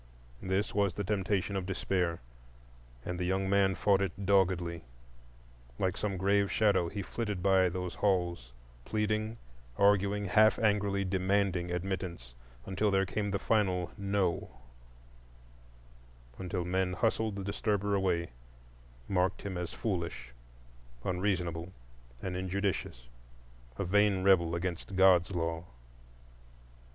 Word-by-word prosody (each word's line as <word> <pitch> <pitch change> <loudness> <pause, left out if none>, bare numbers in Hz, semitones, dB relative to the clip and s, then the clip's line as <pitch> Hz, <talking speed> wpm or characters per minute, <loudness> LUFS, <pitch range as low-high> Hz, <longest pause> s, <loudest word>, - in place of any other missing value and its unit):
This 95 +2 -1
was 100 -4 +1
the 100 - -2
temptation 100 0 -1
of 95 -2 -2
Despair; 90 -4 -1 0.8
and 90 0 -4
the - - -1
young 95 +2 0
man 95 -1 +3
fought 100 0 +3
it 100 +1 -3
doggedly. 90 -4 +2 0.9
Like 95 -1 0
some 100 -2 -2
grave 100 +1 +2
shadow 100 -6 +2
he 100 +2 -4
flitted 105 -4 -4
by 95 -2 +4
those 90 0 -4
halls, 85 -10 0 0.3
pleading, 110 - -1 0.4
arguing, 100 0 +3
half 110 +3 +5
angrily 100 -2 +1
demanding 95 -1 +1
admittance, 90 -7 -4 0.3
until 100 +3 0
there 95 -1 +2
came 100 +2 -2
the 100 - 0
final 95 -5 +1
No; 100 -3 -1 1.9
until 90 -1 -3
men 90 0 0
hustled 110 +1 0
the 100 - -4
disturber 100 0 -1
away, 90 -6 0 0.8
marked 95 0 0
him 100 -2 -4
as 90 -1 -4
foolish, 85 - -3 0.7
unreasonable, 90 -2 -1 0.5
and 90 -1 -3
injudicious, 95 - -2 0.7
a 100 - -2
vain 100 0 +3
rebel 85 -4 +4
against 90 +2 -4
God's 95 -2 +5
law. 85 0 -2
95 Hz, 120 wpm, -31 LUFS, 90-100 Hz, 1.9 s, half